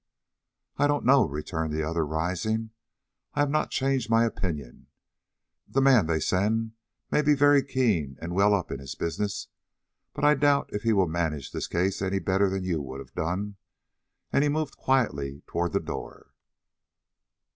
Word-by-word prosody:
"I 145 - +3
don't 145 0 0
know," 130 -3 +5
returned 80 +2 -3
the 80 0 -1
other, 80 +1 0
rising. 90 +8 -2 0.6
"I 145 - +2
have 145 -1 +1
not 155 - +1
changed 135 -4 0
my 115 +1 +4
opinion. 75 - -4 0.8
The 135 - 0
man 130 -9 +5
they 80 -1 +1
send 110 +6 0 0.4
may - - +3
be 150 0 +4
very 145 0 +5
keen 85 - 0
and 85 +1 -5
very - - -4
well 100 +1 +5
up 95 - -3
in 70 - -4
his 70 -1 -7
business, 100 +5 -3 0.7
but 145 - -5
I 150 0 +6
doubt 145 0 +2
if 105 - -2
he 115 +1 +2
will 95 -4 +3
manage 80 -4 -2
this - - -3
case 95 +3 0
any 95 0 0
better 95 +1 +2
than 95 0 -2
you 85 -4 -1
would 65 -1 -7
have 65 -2 -11
done," 95 +5 -3 0.8
and - - +4
he 145 - +2
moved 155 -1 -2
quietly 70 - 0
toward 85 +1 -2
the - - +1
door. - - -8
100 Hz, 175 wpm, -27 LUFS, 80-130 Hz, 0.8 s, I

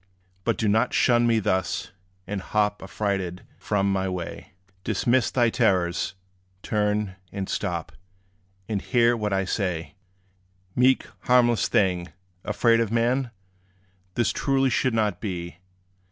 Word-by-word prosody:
But 115 - +1
do 110 - 0
not 110 +4 +2
shun 120 -1 +4
me 115 -1 +3
thus, 95 -4 -1 0.3
and 100 0 -4
hop 105 +1 0
Affrighted 95 -2 -3 0.2
from 100 -1 0
my 95 0 0
way. 90 -1 -6 0.3
Dismiss 120 +4 +2
thy 120 -3 +2
terrors 90 -1 +1 0.5
turn, 105 -2 0
and 100 -2 -4
stop; 85 -5 -3 0.8
And 105 -3 -2
hear 120 -1 +3
what 105 -3 -2
I 95 0 +2
may - - -3
say. 90 -6 -2 0.8
Meek, 130 +1 +4 0.2
harmless 120 -2 +4
thing, 90 -3 +1 0.4
afraid 115 +2 +3
of 115 -2 0
man? 120 +3 +1 0.9
This 120 -2 +2
truly 135 -1 +1
should 130 -1 +1
not 105 -5 0
be. 85 -5 -5
105 Hz, 130 wpm, -25 LUFS, 95-120 Hz, 0.9 s, shun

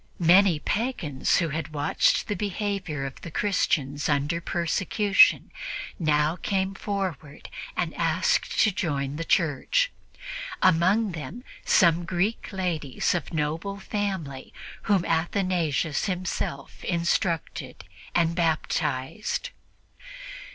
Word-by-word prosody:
Many 180 0 +5
pagans 175 - 0
who 170 -2 +1
had 155 +1 -4
watched 145 +1 +2
the 210 - 0
behavior 200 -8 -2
of 135 - -7
the - - -7
Christians 150 -7 0
under 145 +3 +1
persecution 195 +4 +3 0.5
now 155 0 +2
came 190 0 -1
forward 190 -8 -4 0.3
and 175 -3 -1
asked 165 +2 +1
to 215 - +5
join 145 -5 -2
the 165 - -2
Church, 165 - +1 0.7
among 185 +4 +3
them 170 +9 -7 0.2
some 170 -1 +4
Greek 185 +6 -1
ladies 170 -8 -1
of 175 - -3
noble 160 +5 -2
family 190 -10 -4 0.4
whom 195 -4 +3
Athanasius 165 -3 0
himself 180 -7 -4
instructed 170 -1 -1 0.3
and 170 -1 +3
baptized. 160 -1 -1
170 Hz, 100 wpm, -26 LUFS, 150-195 Hz, 0.7 s, Many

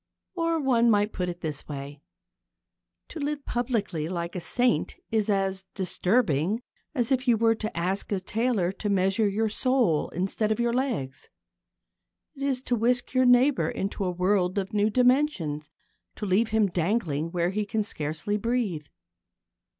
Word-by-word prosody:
Or 330 -2 0
one 240 -4 +3
might 210 -1 +2
put 180 -1 -2
it 175 0 -7
this 155 -4 -4
way. 140 0 -7 1.1
To 330 - -7
live 290 0 -3
publicly 215 - -1
like 170 -1 -4
a 180 - -3
saint 245 +8 +1 0.2
is 220 -2 +1
as 195 -1 0
disturbing 190 - +1 0.3
as 245 -1 0
if 260 0 +1
you 235 -2 +5
were 225 +1 +4
to 215 -4 -5
ask 185 +5 -1
a 200 - +1
tailor 210 -2 0
to 205 +2 -4
measure 195 +2 +2
your 215 +3 0
soul 225 - +1
instead 195 +4 -1
of 220 - 0
your 235 0 +1
legs. 235 - -2 1.0
It 275 - -13
is 270 -2 0
to 250 - 0
whisk 245 +3 +1
your 255 0 +4
neighbour 250 +3 +4
into 200 -4 -3
a 180 - 0
world 180 +1 +1
of 195 0 -2
new 210 0 +3
dimensions 245 - +1 0.5
to 210 - -5
leave 205 +4 +2
him 220 -1 +3
dangling 170 -4 -1
where 175 0 0
he 210 +2 -1
can 215 +1 -1
scarcely 160 +3 -2
breathe. 210 -9 -1
210 Hz, 160 wpm, -27 LUFS, 180-245 Hz, 1.1 s, you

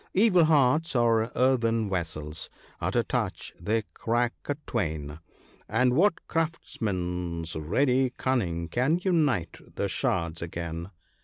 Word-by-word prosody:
Evil 185 -4 +5
hearts 150 0 +3
are 115 -1 +3
earthen 115 -4 +2
vessels 80 -5 -4 0.2
— - - -28
at - - -1
a - - +3
touch - - -3
they 110 +5 0
crack 120 +1 0 0.2
a 145 - +1
twain, 75 -3 -3 0.5
And 125 +3 +3
what 175 +6 +2
craftsman's 90 - -2
ready 125 - +2
cunning 90 -11 0
can 135 - +1
unite 145 - +1 0.2
the - - 0
shards 85 -2 -1
again 85 0 -5
115 Hz, 125 wpm, -27 LUFS, 85-135 Hz, 0.5 s, Evil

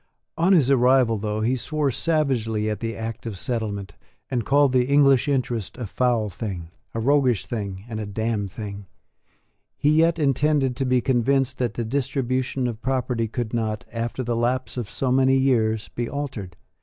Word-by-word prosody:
On 170 +4 +2
his 140 -7 +4
arrival, 125 -3 +4
though 105 +1 -2
he 120 +4 +1
swore 145 +2 -1
savagely 120 -7 0
at 105 - -3
the 115 -1 -3
Act 115 +1 -5
of 105 -4 -5
Settlement, 100 -3 -3 0.4
and 120 -3 0
called 140 -1 +4
the 125 -1 +3
English 140 -2 +4
interest 120 -7 -1
a 125 - -4
foul 120 0 +1
thing, 90 -4 -5 0.3
a - - -1
roguish 130 -2 +2
thing, 100 -5 -5
and 110 -2 -5
a 105 - -4
damned 105 -1 -2
thing, 100 -1 -7 0.9
he 145 - +3
yet 165 +2 +4
intended 145 -2 +2
to 135 - 0
be 125 -1 +2
convinced 135 +1 +1
that 120 -3 -1
the 120 - -2
distribution 130 0 -1
of 115 -2 -3
property 125 -3 -1
could 115 0 -4
not, 110 -1 -2
after 115 +2 -3
the 120 -1 -1
lapse 125 +3 0
of 120 -5 -4
so 130 -2 -1
many 130 +1 +4
years, 115 -5 +1
be 120 -1 -4
altered. 125 -11 -5
120 Hz, 175 wpm, -24 LUFS, 110-135 Hz, 0.9 s, his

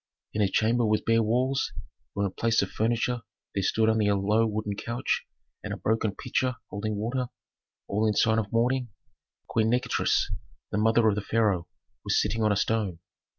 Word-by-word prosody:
In 105 - 0
a 100 - +4
chamber 115 +5 +2
with 110 -1 +1
bare 115 0 +4
walls, 125 +5 +1 0.4
where 100 - 0
in 100 - -2
place 115 0 +2
of 95 - -5
furniture 115 +2 0 0.3
there 100 - 0
stood 110 +4 +2
only 110 -2 +3
a 100 - +3
low 105 +3 +2
wooden 105 -1 -2
couch 115 +4 -2 0.4
and - - -5
a - - -3
broken 110 -2 0
pitcher 130 +3 -1 0.2
holding 105 +1 -2
water, 120 +5 -2 0.6
all 105 +2 +1
in 105 - +1
sign 110 +1 +3
of 105 -2 -4
mourning, 125 +2 +1 0.6
Queen 110 0 +1
Nikotris, 125 +2 +1 0.4
the 105 - 0
mother 115 +1 +4
of 105 - +4
the 105 - -2
pharaoh, 100 -5 +1 0.4
was - - +2
sitting 115 +1 0
on 105 -1 +3
a - - +3
stone. 105 -4 0
110 Hz, 185 wpm, -27 LUFS, 105-115 Hz, 0.6 s, a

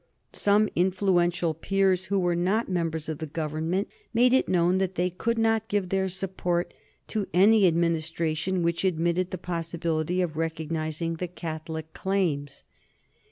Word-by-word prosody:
Some 205 +1 +3
influential 175 -2 +2
peers 190 +2 +1
who 200 +1 0
were 175 -2 +1
not 190 +7 +1
members 165 -4 -2
of 155 -2 -4
the 160 - -4
Government 160 +5 -2 0.3
made 245 +2 +5
it 260 - +3
known 180 +1 +3
that 190 -1 -1
they 180 +1 0
could 230 +6 -1
not 225 -1 +2
give 205 -5 -1
their 190 0 0
support 180 -2 -2 0.4
to 210 -3 -2
any 200 +2 +6
Administration 165 +1 0
which 170 +1 0
admitted 175 0 +1
the 185 - -4
possibility 170 0 -2
of 160 -3 -4
recognizing 160 0 -2
the 180 - -3
Catholic 160 -2 -6
claims. 165 -8 -1
175 Hz, 145 wpm, -27 LUFS, 165-190 Hz, 0.4 s, any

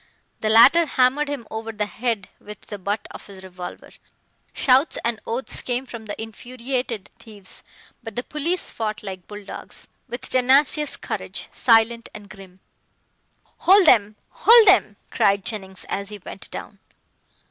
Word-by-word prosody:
The 215 - -1
latter 275 +10 +7
hammered 275 +3 +2
him 280 -5 -5
over 220 +1 -5
the 210 -1 -2
head 220 -2 -3
with 210 -1 -10
the 205 - -9
butt 205 +2 -3
of - - -11
his 195 -2 -12
revolver. 180 -1 -9 0.6
Shouts 265 +4 +3
and 235 -2 -1
oaths 240 +4 -3
came 250 +1 -2
from 235 -4 -10
the 205 - -6
infuriated 240 0 -5
thieves, 205 -4 -10 0.4
but 225 -3 -9
the 245 - -2
police 330 +6 -2
fought 215 -2 -4
like 190 -3 -8
bulldogs, 205 -1 -9 0.2
with 240 - -5
tenacious 275 +4 +2
courage, - - -6
silent 230 0 +3
and 210 -1 -11
grim. 190 -2 -14 1.0
"Hold 390 +1 +5
them 210 -7 +4
hold 460 -1 +6
them!" 365 - +5 0.2
cried 200 -1 +2
Jennings, 190 -4 -6
as 200 0 -4
he 210 - -8
went 195 0 -10
down. 200 - -9
225 Hz, 145 wpm, -22 LUFS, 205-255 Hz, 1.0 s, latter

